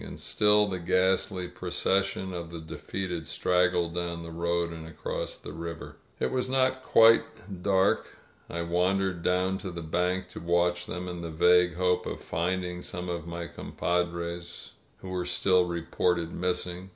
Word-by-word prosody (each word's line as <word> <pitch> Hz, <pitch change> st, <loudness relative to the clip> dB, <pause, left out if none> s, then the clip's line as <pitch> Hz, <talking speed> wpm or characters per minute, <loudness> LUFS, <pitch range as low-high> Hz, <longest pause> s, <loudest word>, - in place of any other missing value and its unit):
• -, -, -9 dB
• -, -, -7 dB
• -, -, -7 dB
And -, -, -9 dB
still 105 Hz, 0 st, +4 dB
the 95 Hz, -3 st, -3 dB
ghastly 95 Hz, +1 st, +1 dB
procession 95 Hz, +2 st, -1 dB
of 85 Hz, -1 st, -5 dB
the 85 Hz, -1 st, -7 dB
defeated 85 Hz, +1 st, -5 dB
straggled 90 Hz, -1 st, +2 dB
down 85 Hz, -1 st, -3 dB
the 85 Hz, -, -8 dB
road 85 Hz, 0 st, 0 dB
and 80 Hz, -1 st, -8 dB
across 80 Hz, -, -4 dB
the -, -, -9 dB
river. 85 Hz, 0 st, -6 dB, 0.2 s
It 65 Hz, -, 0 dB
was 130 Hz, 0 st, 0 dB
not 130 Hz, 0 st, +4 dB
yet 130 Hz, 0 st, -14 dB
quite 115 Hz, -5 st, +4 dB
dark. 95 Hz, 0 st, +3 dB, 0.4 s
I 85 Hz, 0 st, -3 dB
wandered 90 Hz, +1 st, +1 dB
down 90 Hz, +2 st, +1 dB
to 95 Hz, -, -5 dB
the 85 Hz, -1 st, -6 dB
3bank 90 Hz, +3 st, 0 dB
to -, -, -8 dB
watch 85 Hz, +1 st, +1 dB
them, 90 Hz, 0 st, -5 dB
in 90 Hz, -1 st, -5 dB
the 85 Hz, -, -5 dB
vague 90 Hz, +1 st, +4 dB
hope 90 Hz, 0 st, +1 dB
of -, -, -5 dB
finding 90 Hz, +1 st, -2 dB
some 90 Hz, 0 st, -5 dB
of 85 Hz, -1 st, -4 dB
my 85 Hz, 0 st, -4 dB
compadres 85 Hz, 0 st, -3 dB, 0.3 s
who 95 Hz, -, -7 dB
were 90 Hz, -1 st, -1 dB
still 90 Hz, 0 st, +3 dB
reported 85 Hz, 0 st, 0 dB
missing. 90 Hz, +1 st, -2 dB
90 Hz, 175 wpm, -28 LUFS, 85-95 Hz, 0.4 s, still